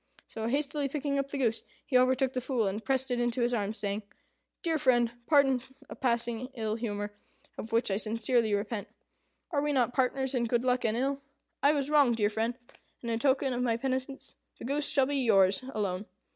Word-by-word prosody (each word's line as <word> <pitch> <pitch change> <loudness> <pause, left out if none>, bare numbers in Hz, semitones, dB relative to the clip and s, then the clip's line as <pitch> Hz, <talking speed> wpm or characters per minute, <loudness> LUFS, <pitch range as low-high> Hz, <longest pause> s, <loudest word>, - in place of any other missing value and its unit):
So, 225 0 -4
hastily 285 +2 -1
picking 280 0 -1
up 275 0 -2
the 280 - -4
goose, 230 -4 +1 0.2
he 270 - -3
overtook 260 +1 +3
the 255 - -1
Fool, 245 -4 0
and 205 +3 -3
pressed 265 -1 0
it 245 - 0
into 240 0 0
his 240 +1 +1
arms, 215 -1 -1
saying, 205 0 -2 0.6
"Dear 325 -3 +1
friend, 240 -4 +3 0.2
pardon 275 -4 +4 0.3
a - - -6
passing 235 -1 -1
ill 220 -2 -2
humour, 205 -2 -3 0.4
of 225 - -7
which 230 -2 +1
I 195 - +1
sincerely 225 +1 +1
repent. 205 +1 -3 0.6
Are 290 -4 +1
we 295 0 0
not 250 -4 +2
partners 265 0 0
in 245 -2 +1
good 235 +1 +1
luck 250 -1 +1
and 220 0 +1
ill? 275 +2 -1 0.4
I 285 +2 +5
was 285 -1 -1
wrong, 285 -5 +5
dear 210 -2 +1
friend; 225 +3 -1 0.5
and, 235 - -2
in 225 - 0
token 265 0 +2
of 245 - -1
my 235 -2 +1
penitence, 260 +2 -3 0.2
the - - -8
goose 285 +3 0
shall 270 - +3
be 285 +1 -1
yours 195 -6 +4
alone. 200 -3 -2
245 Hz, 200 wpm, -30 LUFS, 225-270 Hz, 0.6 s, I